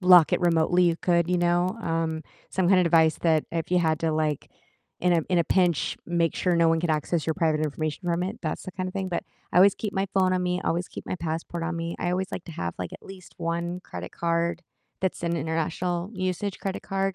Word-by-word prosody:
lock 180 -3 +7
it - - +2
remotely, 175 +1 +3
you 170 -1 +3
could, 170 -1 +2
you 180 - +2
know, 175 +3 +2
um, 165 -2 -1 0.3
some 185 -2 +1
kinda 185 -2 +5
device 160 -2 +4
that 160 -2 +2
if 165 +1 -2
you 180 - +4
had 160 -2 +2
to, 165 - +1
like, 155 -2 -1 0.5
in 180 -1 +3
a 165 - +2
in 180 - +4
a 170 - +3
pinch, 175 -4 +2
make 170 -1 +1
sure 180 -2 +1
no 170 -1 +4
one 165 - +3
could 170 0 0
access 155 +1 0
your 160 - +2
private 160 -4 +1
information 155 +3 -3
from 170 0 +1
it, 195 +5 -4
that's 155 -3 -3
the 185 - -7
kind 185 0 -3
of - - -7
thing, 190 -1 -2
but 175 - -2 0.3
I - - -1
always 195 +2 +7
keep 210 -2 -4
my 195 0 +1
phone 185 -1 +3
on 180 - 0
me, 180 0 0
always 175 +2 0
keep - - -9
my - - -2
passport 165 +1 -4
on 170 +1 -2
me, 165 0 -3
I 175 - -1
always 185 +1 -1
like 180 - -5
to 170 - -9
have, 85 - -4
like, 90 -1 -4
at - - -10
least 190 -2 -12
1 170 +1 -2
credit 90 - -8
card 170 0 0 0.4
that's 190 -2 -1
an 170 0 0
international 165 +3 -2
usage 185 0 -2
credit 195 -1 -4
card, 195 0 -1
170 Hz, 240 wpm, -26 LUFS, 165-180 Hz, 0.5 s, lock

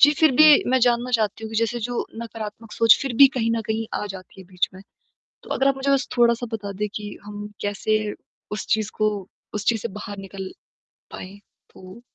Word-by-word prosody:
जी, 290 - +8
फिर 315 0 +6
भी 310 - +8 0.3
मैं 260 - +4
जानना 245 0 +1
चाहती 220 0 -2
हूँ 220 - -6
कि 225 - -4
जैसे 230 +1 0
जो 240 +2 -2 0.2
नकारात्मक 220 -1 -8
सोच 230 -1 +6
फिर 270 -2 -2
भी 275 +2 +10
कहीं 230 -2 +1
न - - -1
कहीं 220 0 -1
आ - - -1
जाती 185 +1 -12
है - - -11
बीच 180 -1 0
में 190 - -11 0.6
तो - - -15
अगर 270 - +3
आप 275 - +3
मुझे 270 +1 -1
बस 275 -2 +2
थोड़ा-सा 240 0 +3
बता 205 -2 -4
दें 210 - +1
कि 210 -1 -5 0.2
हम 205 0 -7
कैसे 205 +1 0 0.5
उस 210 - -4
चीज़ 215 -1 +1
को 215 - +3 0.5
उस 210 -1 -3
चीज़ 225 -2 +2
से - - -2
बाहर 205 -1 -7
निकल 195 -1 -7 0.6
पाएँ? 195 +2 -9 0.3
तो 185 +5 -13
220 Hz, 215 wpm, -23 LUFS, 205-240 Hz, 0.6 s, भी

